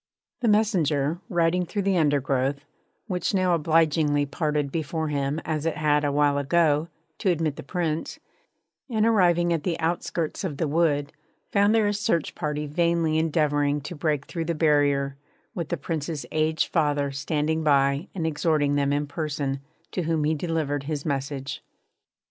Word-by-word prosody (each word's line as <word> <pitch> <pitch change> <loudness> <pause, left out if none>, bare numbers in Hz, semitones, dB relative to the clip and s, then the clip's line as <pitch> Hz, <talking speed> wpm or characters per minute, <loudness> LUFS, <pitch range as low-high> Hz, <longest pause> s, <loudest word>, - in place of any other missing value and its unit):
The 240 - 0
messenger, 170 -8 +2
riding 175 +1 +2
through 200 +3 -3
the 195 0 +2
undergrowth 140 -2 +1 0.4
which 185 0 -1
now 185 -2 +2
obligingly 155 -2 +2
parted 150 -1 -1
before 160 0 -2
him 140 +1 -1
as 155 0 -1
it 165 - -1
had, 150 -1 +2
a 145 - +1
while 145 0 +2
ago, 155 +1 +2 0.3
to 195 - +1
admit 160 -4 0
the - - -7
Prince 165 -3 -3 0.7
and 220 -3 +1
arriving 175 -6 +3
at 165 - -1
the 170 0 -2
outskirts 165 0 -2
of 160 -7 -3
the 160 - 0
wood, 145 -2 +1 0.4
found 205 +2 +4
there 220 -2 +3
a 205 - +1
search 205 -6 0
party 150 0 -3
vainly 165 0 +1
endeavouring 150 -2 +1
to 150 +5 -7
break 150 -2 -1
through 165 -2 -4
the 170 0 -1
barrier, 145 -3 +2 0.4
with 170 -3 -4
the 175 - -1
Prince's 155 -2 -4
aged 155 0 +1
father 145 -4 +1
standing 150 +3 -1
by 140 +2 +2
and 170 -4 -2
exhorting 150 -2 +1
them 140 -1 +1
in 145 +1 0
person, 145 -2 -3 0.3
to 185 - -2
whom 160 -2 0
he 155 +2 +2
delivered 150 -3 -2
his 150 -1 -3
message. 140 -1 -3
155 Hz, 160 wpm, -25 LUFS, 145-170 Hz, 0.7 s, found